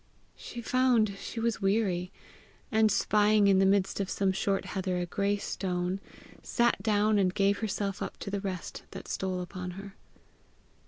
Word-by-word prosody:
She 240 - -8
found 235 -4 +2
she 230 - -6
was 230 -1 -1
weary, 195 -3 +1 0.6
and 220 -1 +4
spying 210 +1 +3
in 195 -1 +5
the 195 - +5
midst 195 0 +2
of 195 -1 -1
some 195 -1 +1
short 195 +1 0
heather 185 -2 -2
a 175 - -1
great 200 +3 -1
stone, 180 0 -2 0.4
sat 240 0 +1
down, 210 -1 +2
and 185 -2 +3
gave 200 +2 +2
herself 200 -2 -2
up - - -4
to 200 - -5
the 200 0 -2
rest 185 -3 -5
that - - -9
stole 185 -1 -2
upon 180 0 -6
her. 195 0 -8
200 Hz, 165 wpm, -29 LUFS, 190-215 Hz, 0.6 s, in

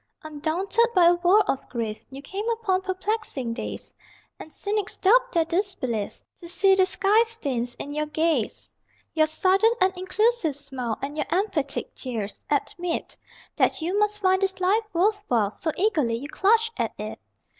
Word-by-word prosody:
Undaunted 325 +9 0
by 360 -2 +6
a 345 - +7
world 370 +4 +4
of 270 - -2
grief 225 -2 -4
You 270 +1 -10
came 405 +8 -4
upon 435 -5 0
perplexing 375 - -3
days, - - -6 0.5
And 315 - -10
cynics 415 +2 -2
doubt - - +4
their 335 -2 +2
disbelief 325 - -2
To 345 - -11
see 385 +2 +4
the 380 -1 +5
sky 395 +3 +3
stains 280 - -2
in 290 - -6
your 300 0 -1
gaze. 310 -6 -1 0.4
Your 310 -1 +3
sudden 380 +7 +3
and 375 0 +2
inclusive 375 - +1
smile 265 -5 -4
And 290 +2 -4
your - - -1
emphatic 345 -7 -1
tears, 225 -6 -5
admit 350 -1 -2 0.4
That - - +2
you 370 +5 0
must 420 -1 0
find 375 0 +3
this 385 -1 0
life 385 +5 +3
worth 410 +4 +1
while, 220 -5 +1
So 320 - -4
eagerly 315 - +1
you 275 +5 -6
clutch 450 +5 +2
at - - -1
it! - - -6
360 Hz, 165 wpm, -25 LUFS, 285-405 Hz, 0.5 s, a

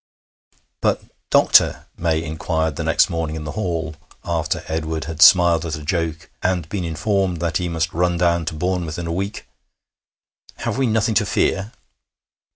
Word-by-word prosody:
'But, - - +1 0.3
doctor,' - - +4
May 80 -1 0
inquired 80 -1 -2
the - - -3
next - - +3
morning 80 -2 -3
in 80 - -5
the 75 - -5
hall, 85 -4 -3 0.3
after 85 -2 -1
Edward 80 0 -2
had 80 0 -6
smiled 85 -2 +7
at 80 -2 -3
a 75 - -8
joke, 80 0 -2
and 90 -4 0
been 100 -3 -3
informed 90 +2 -1
that 85 -2 0
he 90 -1 -2
must 80 -1 -2
run 85 +1 +1
down 85 -1 +2
to 80 - -4
Bournemouth 85 -1 -2
in 85 - -4
a 85 - -2
week, 100 +4 -4 1.1
'have - - -3
we 135 - +2
nothing 110 0 +1
to - - +2
fear?' 100 +4 0
85 Hz, 165 wpm, -21 LUFS, 80-90 Hz, 1.1 s, smiled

